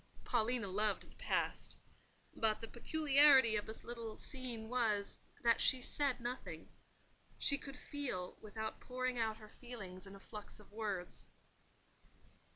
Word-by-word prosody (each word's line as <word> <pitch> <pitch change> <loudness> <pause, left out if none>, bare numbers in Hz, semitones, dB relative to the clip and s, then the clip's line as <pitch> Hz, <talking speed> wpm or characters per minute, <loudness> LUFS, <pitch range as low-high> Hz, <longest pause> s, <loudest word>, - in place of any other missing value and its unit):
Paulina 230 -1 +1
loved 205 +2 0
the - - -20
Past; - - 0 0.6
but 220 -1 +2
the 225 - -6
peculiarity 275 -2 +5
of 210 - -1
this 220 - 0
little 230 -2 -5
scene 245 -5 -4
was, 220 -4 +1 0.2
that 230 -1 +4
she 260 - +5
said 280 +1 +1
nothing: 245 +2 -5 0.7
she 285 - +5
could 280 0 -7
feel 250 -11 -3
without 220 +1 -5
pouring 255 -1 -2
out 220 -1 0
her 215 -1 -13
feelings 205 -7 -9
in 195 - -10
a - - -11
flux 210 +1 -8
of 210 - -17
words. 205 -4 -4
225 Hz, 140 wpm, -37 LUFS, 210-255 Hz, 0.7 s, peculiarity